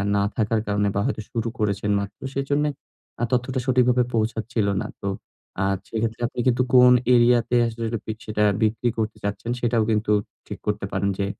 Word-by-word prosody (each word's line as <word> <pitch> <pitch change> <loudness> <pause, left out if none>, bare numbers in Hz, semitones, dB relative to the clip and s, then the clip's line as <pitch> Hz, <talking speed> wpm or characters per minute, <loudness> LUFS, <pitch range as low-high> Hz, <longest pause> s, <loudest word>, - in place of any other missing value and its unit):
না 100 - +2
থাকার 110 0 +1
কারণে 100 0 +1
বা 100 - +1
হয়তো - - -1
শুরু 115 -1 -2
করেছেন 105 -1 0
মাত্র, 100 0 -6
সেজন্যে 145 +2 0 0.5
আ - - +1
তথ্যটা 125 +1 0
সঠিকভাবে 125 -1 +3
পৌঁছাচ্ছিল 110 -1 0
না। 105 - -4
তো - - -3 0.5
আ - - +2 0.3
সেক্ষেত্রে 115 +1 -2
আপনি 125 - -8
কিন্তু 125 0 +3
কোন 125 0 +8 0.2
এরিয়াতে 120 0 +4
আসলে 115 0 -4
সেটা, 115 - -1 0.3
সেটা 105 0 0 0.2
বিক্রি 110 +2 +1
করতে 110 -1 -2
চাচ্ছেন 100 +3 -3
সেটাও 115 -2 +2
কিন্তু 105 0 +1 0.4
ঠিক - - -7
করতে 105 -1 -1
পারেন 100 +1 0
যে, 100 - +1
115 Hz, 175 wpm, -23 LUFS, 105-125 Hz, 0.5 s, কোন